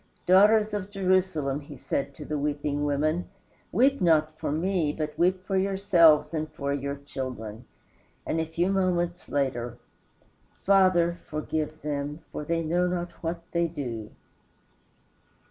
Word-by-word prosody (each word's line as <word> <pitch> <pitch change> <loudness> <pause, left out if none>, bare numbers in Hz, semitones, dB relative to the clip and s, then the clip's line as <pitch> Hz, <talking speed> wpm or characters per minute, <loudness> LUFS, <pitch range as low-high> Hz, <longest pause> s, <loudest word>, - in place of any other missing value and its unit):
"Daughters 210 +3 +5
of 200 -2 -3
Jerusalem," 185 -8 +1
he 145 -1 -11
said 140 +2 -3
to - - -9
the 150 -1 -2
weeping 145 0 -1
women, 155 +5 0 0.4
"weep 270 +1 +3
not 155 -3 +3
for - - -2
me, 165 0 0
but 150 0 -4
weep 185 +2 +1
for 195 - -2
yourselves 190 -5 +4
and 155 -1 -3
for 140 -1 -2
your 140 0 -3
children." 125 -6 -6 0.6
And 165 - -1
a 160 - 0
few 170 +4 0
moments 180 -2 0
later, 120 -4 -1 0.9
"Father, 185 -3 +4
forgive 155 0 -3
them, 145 +1 -3
for - - -5
they 165 +2 -1
know 175 +3 +1
not 175 -1 -2
what 170 0 -3
they 170 0 +1
do." 120 -9 -5
160 Hz, 140 wpm, -27 LUFS, 145-180 Hz, 0.9 s, Daughters